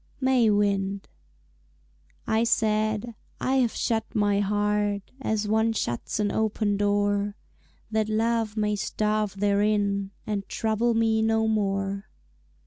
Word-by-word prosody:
May 260 Hz, -4 st, +3 dB
Wind 200 Hz, -1 st, 0 dB, 1.2 s
I 220 Hz, +1 st, +2 dB
said, 215 Hz, 0 st, +1 dB, 0.3 s
"I 265 Hz, +1 st, +1 dB
have 245 Hz, -3 st, +2 dB
shut 225 Hz, -1 st, -1 dB
my 205 Hz, -1 st, +2 dB
heart 205 Hz, 0 st, 0 dB
As 215 Hz, -4 st, -1 dB
one 220 Hz, +1 st, +2 dB
shuts 120 Hz, -, -3 dB
an 205 Hz, -1 st, +1 dB
open 215 Hz, -1 st, 0 dB
door, 205 Hz, 0 st, +1 dB, 0.6 s
That 220 Hz, 0 st, 0 dB
Love 225 Hz, 0 st, 0 dB
may 210 Hz, -1 st, +1 dB
starve 210 Hz, -1 st, -1 dB
therein 200 Hz, -1 st, +1 dB, 0.2 s
And 205 Hz, -2 st, -3 dB
trouble 225 Hz, +1 st, 0 dB
me 225 Hz, -1 st, +2 dB
no 220 Hz, 0 st, +2 dB
more." 195 Hz, -1 st, -1 dB
210 Hz, 120 wpm, -26 LUFS, 205-220 Hz, 1.2 s, May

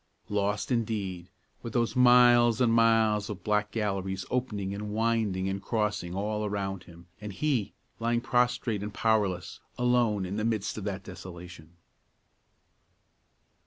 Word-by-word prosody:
Lost, 105 Hz, +3 st, -1 dB
indeed, 100 Hz, -7 st, -2 dB, 0.3 s
with 115 Hz, -, -7 dB
those 120 Hz, -1 st, 0 dB
miles 120 Hz, -2 st, +6 dB
and 120 Hz, -3 st, +3 dB
miles 110 Hz, -2 st, +3 dB
of 105 Hz, -3 st, -7 dB
black 105 Hz, -1 st, +1 dB
galleries 95 Hz, -3 st, -2 dB
opening 105 Hz, -6 st, -2 dB
and 105 Hz, +1 st, -5 dB
winding 110 Hz, -3 st, 0 dB
and 95 Hz, 0 st, -3 dB
crossing 105 Hz, -5 st, -2 dB
all 105 Hz, +2 st, -2 dB
around 100 Hz, -2 st, -3 dB
him, 85 Hz, 0 st, -15 dB, 0.2 s
and 105 Hz, -1 st, -6 dB
he, 125 Hz, -4 st, -1 dB, 0.2 s
lying 115 Hz, +1 st, +1 dB
prostrate 120 Hz, -3 st, 0 dB
and 105 Hz, 0 st, -6 dB
powerless, 100 Hz, -6 st, 0 dB, 0.2 s
alone 120 Hz, -5 st, +2 dB
in 95 Hz, +3 st, -4 dB
the 110 Hz, -, -1 dB
midst 110 Hz, -3 st, -1 dB
of 105 Hz, -, -6 dB
that 100 Hz, -1 st, -4 dB
desolation. 90 Hz, -3 st, -11 dB
105 Hz, 135 wpm, -28 LUFS, 95-115 Hz, 0.3 s, miles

